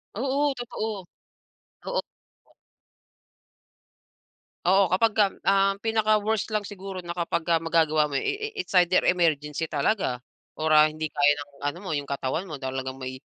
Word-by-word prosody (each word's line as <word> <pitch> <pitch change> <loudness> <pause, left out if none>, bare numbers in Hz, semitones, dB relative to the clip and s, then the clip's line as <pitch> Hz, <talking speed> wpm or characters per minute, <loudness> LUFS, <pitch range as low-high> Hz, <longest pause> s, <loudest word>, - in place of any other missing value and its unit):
Oo, 275 +5 +1
totoo. 220 -4 -4 0.8
Oo. - - -1 2.6
Oo 190 +2 +5
kapagka 205 +2 +2
ang 195 0 +2
pinaka-worst 215 -1 +1
lang 210 - +1
siguro 195 -2 -7
na 170 - -8
kapag 170 0 -1
ah, 165 - +5
magagawa 160 -2 +2
mo 145 - -6
eh 270 - -1
eh 430 0 -4
it's - - -18
either 180 +1 +4
emergency 160 -3 +1
talaga 145 - -1 0.3
or 155 0 -2
ah 155 0 +7
hindi 155 0 -4
kaya 145 0 +4
ng 145 0 -8 0.2
ano 145 +4 -2
mo 190 - -6
'yong 145 -2 -2
katawan 140 +6 -2
mo 150 -6 -8
talagang 130 0 -3
may 130 0 -7
175 Hz, 145 wpm, -26 LUFS, 150-205 Hz, 2.6 s, ah